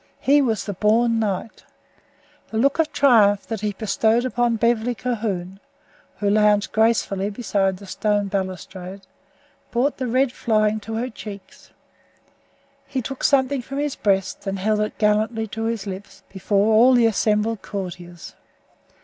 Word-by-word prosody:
He 285 +2 +4
was 225 -7 -1
the 205 - -4
born 225 +4 +2
knight. 210 0 -3 0.9
The 220 - -4
look 275 +7 +2
of 320 - +2
triumph 210 -7 +4
that 225 -3 -5
he 210 -1 -1
bestowed 220 +3 +1
upon 240 -2 +1
Beverly 235 +1 +1
Calhoun, 205 -7 -3 0.6
who 205 - -2
lounged 210 0 +3
gracefully 215 -3 +1
beside 200 -3 -1
the 200 - -12
stone 205 +1 -1
balustrade, 190 0 -5 0.7
brought 255 +4 0
the 260 - -3
red 255 +2 +2
flying 215 -3 +1
to 220 +1 -6
her 245 +3 -3
cheeks. 200 -3 -11 1.2
He 265 - -3
took 270 +3 -6
something 275 -1 +2
from 275 +3 -7
his 290 -1 -1
breast 195 0 -1
and 195 0 -2
held 210 +2 0
it 210 0 -2
gallantly 215 +1 +1
to 225 +2 -4
his 225 -3 -2
lips, 200 0 -8
before 200 +2 +1
all 245 +4 +6
the 240 -1 +4
assembled 215 0 +1
courtiers. 175 -4 -7
215 Hz, 150 wpm, -22 LUFS, 200-235 Hz, 1.2 s, all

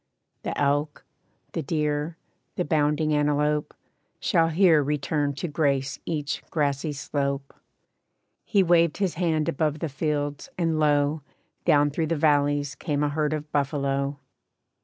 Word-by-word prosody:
The - - -4
elk, 145 0 0 0.5
the - - -2
deer, 150 +1 -1 0.4
the 180 - -1
bounding 150 0 +1
antelope, 150 0 +1 0.5
Shall 165 0 +3
here 165 -2 +5
return 145 0 -1
to 175 - -3
grace 140 -3 0
each 150 -3 -2
grassy 145 0 0
slope.' 140 -1 -3 0.9
He 200 -4 +3
waved 170 -2 +3
his 195 -4 0
hand 160 -3 0
above 150 +1 0
the 160 +1 -3
fields, 145 0 -2
and 165 -3 +1
lo! 145 0 +2 0.4
Down 145 0 +4
through 160 +2 -1
the 165 - 0
valleys 145 -2 +2
came 150 -3 -2
a 145 - +2
herd 150 0 0
of 150 -1 -4
buffalo. 140 -1 0
150 Hz, 135 wpm, -25 LUFS, 145-155 Hz, 0.9 s, here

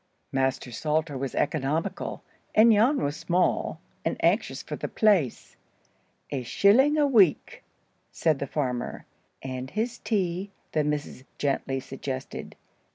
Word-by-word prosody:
Master 135 -2 0
Salter 155 +4 -1
was 135 0 -4
economical, 155 +7 -1 0.3
and 225 +2 +7
Jan 230 +7 +4
was 145 +1 -1
small, 180 +2 0 0.2
and - - -1
anxious - - +1
for - - -5
the - - -4
place. 190 - +1 0.8
"A 135 - -1
shilling 240 - +4
a 295 - +4
week," 210 - +3 0.5
said 155 -4 +1
the 140 - -3
farmer. 125 -4 -3 0.4
"And 130 0 -5
his 225 - -2
tea?" 190 -2 -1 0.2
the 155 - +1
missus 150 -3 -3
gently 135 -1 -1
suggested. 130 0 -6
150 Hz, 125 wpm, -27 LUFS, 135-205 Hz, 0.8 s, and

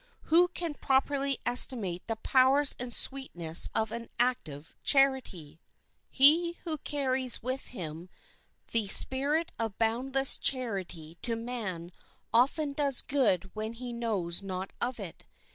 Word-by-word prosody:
Who 350 +2 +6
can 340 -3 -5
properly 275 0 0
estimate 225 -7 +2
the 225 - -2
powers 265 +5 +3
and 245 0 -4
sweetness 175 -14 +1
of 220 0 -1
an 230 0 -7
active 165 - -2
charity? 260 - 0 0.5
He 325 +6 +5
who 315 -3 -4
carries 260 -4 0
ever - - -21
with 260 +1 -4
him 170 -5 -8 0.6
the 225 -3 -1
spirit 285 +10 +4
of 225 -3 -4
boundless 260 +4 +2
charity 190 - -1
to 235 -2 -2
man 215 -8 -6 0.4
often 280 +5 +1
does 280 -3 -1
good 195 -10 0
when 220 +1 -5
he 240 +1 -8
knows 205 -8 -3
not 190 -1 -6
of 245 0 -2
it. 190 -5 -8
245 Hz, 130 wpm, -28 LUFS, 195-270 Hz, 0.6 s, Who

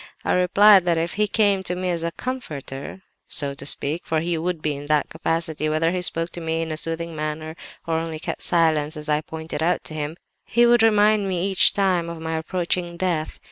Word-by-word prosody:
I - - +2
replied 195 +2 +6
that 170 -2 +2
if 165 +1 -1
he 210 +1 +1
came 205 -2 +2
to 180 -1 -3
me 180 0 -2
as 170 -1 -2
a 170 - -1
'comforter,' 165 - -6 0.2
so 140 -1 -1
to 140 - -5
speak 150 +4 +1
(for 160 - 0
he 170 +2 -1
would 170 +1 -2
be 150 -1 -1
in 145 +1 -8
that 150 -1 +1
capacity 160 -1 -2
whether 160 +2 +1
he 180 0 -2
spoke 165 -1 -2
to 175 - -7
me 165 0 -1
in 160 - -5
a 155 - -3
soothing 165 +1 -2
manner 155 +1 -4 0.3
or 160 -1 0
only 165 -1 -4
kept 155 - -5
silence, 155 -3 +2
as 150 0 -6
I 150 0 +2
pointed 160 0 -6
out 175 +3 +1
to - - -7
him), 155 +1 -4 0.3
he 240 +1 +3
would 240 -1 +5
but 225 - +7
remind 210 -1 +3
me 180 -1 -1
each 195 -2 +4
time 185 -4 +1
of 170 -1 -7
my 160 0 -3
approaching 175 +1 -2
death! 170 -4 -2
165 Hz, 225 wpm, -23 LUFS, 155-180 Hz, 0.3 s, but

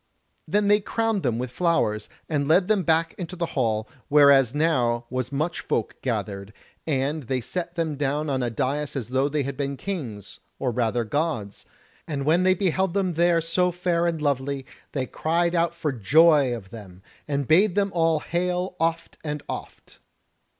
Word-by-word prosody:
Then 205 0 +2
they 205 +1 +5
crowned 225 0 -1
them 120 -6 0
with 125 0 -4
flowers, 130 -10 0 0.2
and 145 -3 -1
led 180 +4 +4
them 210 -2 +3
back 165 -1 +1
into 180 0 -5
the 175 -1 -1
hall, 110 -5 0 0.2
whereas 140 -3 +5
now 125 -7 +1
was 130 0 -2
much 155 +5 -1
folk 110 - -2
gathered, 105 -4 -3 0.3
and 145 +1 0
they 130 0 0
set 175 +7 -5
them 160 -4 -2
down 145 +2 -1
on 135 -2 0
a 120 - 0
dais 140 +6 -2
as 125 -4 -4
though 130 +2 +1
they 145 0 0
had 140 +1 -4
been 140 0 -3
kings, 125 - -6 0.2
or 130 -2 -1
rather 120 0 0
gods; 115 -5 -3 0.4
and 140 -3 -3
when 165 +4 +4
they 185 0 +4
beheld 190 0 0
them 190 -3 +1
there 170 0 +3
so 180 +2 +1
fair 175 -1 0
and 165 -3 -2
lovely, 140 -1 -1 0.3
they 130 -3 -1
cried 170 +5 0
out 170 -1 +1
for 160 -3 -1
joy 145 - +4
of 105 -5 -6
them, 95 -5 -11 0.2
and 140 -2 -1
bade 185 +4 +4
them 200 -1 +1
hail 175 +2 0
oft 165 +1 -1
and 150 -1 -4
oft. - - -8
150 Hz, 175 wpm, -25 LUFS, 130-170 Hz, 0.4 s, they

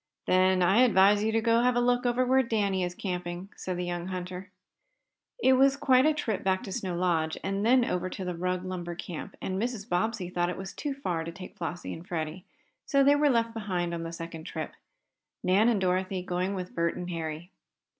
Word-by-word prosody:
"Then 185 0 +4
I 195 +7 +5
advise 205 -3 +5
you 220 - +1
to 225 +1 0
have 240 +2 +4
a - - +3
look 245 0 +2
over 245 +1 +2
where 260 +1 +4
Danny 205 -6 0
is 175 0 -3
camping," 180 0 -4
said 185 -1 -4
the 180 - -2
young 175 0 -3
hunter. 185 +1 -5 0.9
It 265 - +4
was 270 +1 +4
quite 265 -1 +4
a 310 - +4
trip 225 -9 -2
back 190 +1 +1
to 200 - -7
Snow 185 -1 -3
Lodge 165 -3 0
and 195 +1 -1
then 245 +2 +5
over 180 -3 -1
to 190 0 -6
the 180 - -2
Rugg 180 +1 -2
lumber 175 -2 -4
camp, 175 +2 -7
and 190 +1 -2
Mrs. 230 -3 -3
Bobbsey 185 0 -1
thought 175 -1 0
it 190 +2 -5
too 290 -2 -3
far 180 -12 -2
to 165 - -5
take 185 +2 -10
Flossie 175 0 -5
and 165 +2 -10
Freddie, 165 +2 -4 0.4
so 275 -1 +4
they 285 +1 +6
were 290 0 +3
left 230 -3 +1
behind 185 -6 -2
on 170 - -3
the 165 0 -5
second 165 -1 -7
trip, 155 -2 -5 0.7
Nan 195 +6 +4
and 225 -4 +2
Dorothy 185 0 0
going 185 +2 -1
with 180 -1 -5
Bert 170 0 0
and 180 0 -5
Harry. 165 +1 -5
185 Hz, 210 wpm, -28 LUFS, 175-230 Hz, 0.9 s, they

